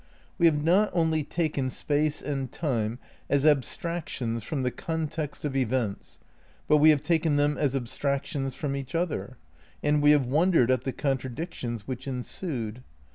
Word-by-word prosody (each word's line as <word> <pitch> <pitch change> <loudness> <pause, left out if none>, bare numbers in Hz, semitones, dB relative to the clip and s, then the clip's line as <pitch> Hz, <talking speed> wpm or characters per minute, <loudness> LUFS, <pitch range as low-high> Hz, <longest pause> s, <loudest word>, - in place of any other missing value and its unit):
We 170 - +6
have 150 -2 +2
not 190 +6 +4
only 160 -3 +2
taken 150 -4 -1
Space 150 +3 -1
and 135 -3 -3
Time 120 -8 -1 0.3
as 140 0 +2
abstractions 140 -5 0
from 135 +4 -2
the 125 - 0
context 155 -1 -4
of 140 -2 -2
events, 125 -5 -1 0.5
but 150 - +5
we 155 +1 +7
have 150 -3 +4
taken 160 -3 +2
them 145 +1 +2
as 140 -3 0
abstractions 135 +1 -2
from 140 -2 -2
each 140 +3 -5
other; 165 -7 -2 0.5
and 150 0 +3
we 145 - +5
have 145 -3 +5
wondered 150 -1 +3
at 130 -1 +1
the 135 - 0
contradic 135 +4 -2
tions 120 -4 -5
which 130 0 -5
ensued. 125 - -4
145 Hz, 160 wpm, -27 LUFS, 130-155 Hz, 0.5 s, we